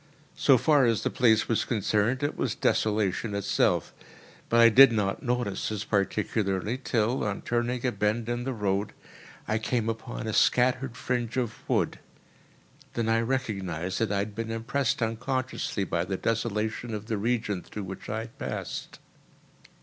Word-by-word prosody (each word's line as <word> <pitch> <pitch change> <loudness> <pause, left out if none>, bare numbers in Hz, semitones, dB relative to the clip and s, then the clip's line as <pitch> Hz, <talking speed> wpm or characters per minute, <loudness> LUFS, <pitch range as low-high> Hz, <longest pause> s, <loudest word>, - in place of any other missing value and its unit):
So 135 - +5
far 145 +1 +4
as 115 -2 +1
the - - 0
place 110 -3 +3
was 115 -1 +1
concerned, 110 +4 0
it 145 - 0
was - - -1
desolation 105 0 0
itself. 100 - +1 0.6
But 115 - +4
I 115 0 +9
did 130 +3 +8
not 105 -3 0
notice 120 -5 -1
this 105 -2 -3
particularly 100 +2 -1
till, 120 +2 +1
on 100 -1 -3
turning 120 +1 -1
a 125 - +2
bend 110 +1 -1
in 120 0 -2
the 135 - -2
road, 100 -3 -1 0.5
I 110 +1 +1
came 115 0 -1
upon 115 +1 -5
a 110 - -2
scattered 125 +2 +2
fringe 120 -2 -2
of 120 -4 0 0.2
wood; - - +1 1.0
then 115 -1 0
I 115 0 +3
recognised 95 -8 -2
that 115 -3 0
I 100 - +1
had 100 +1 -2
been 115 +2 -4
impressed 115 +2 -1
unconsciously 125 -1 -2
by 85 -2 -1
the 95 +1 -2
desolation 110 +1 -2
of 105 0 -6
the 110 -2 -2
region 110 -4 -1
through 105 - -7
which 95 0 -8
I 110 +1 -2
had 115 0 -11
passed. - - -5
115 Hz, 165 wpm, -27 LUFS, 105-120 Hz, 1.0 s, I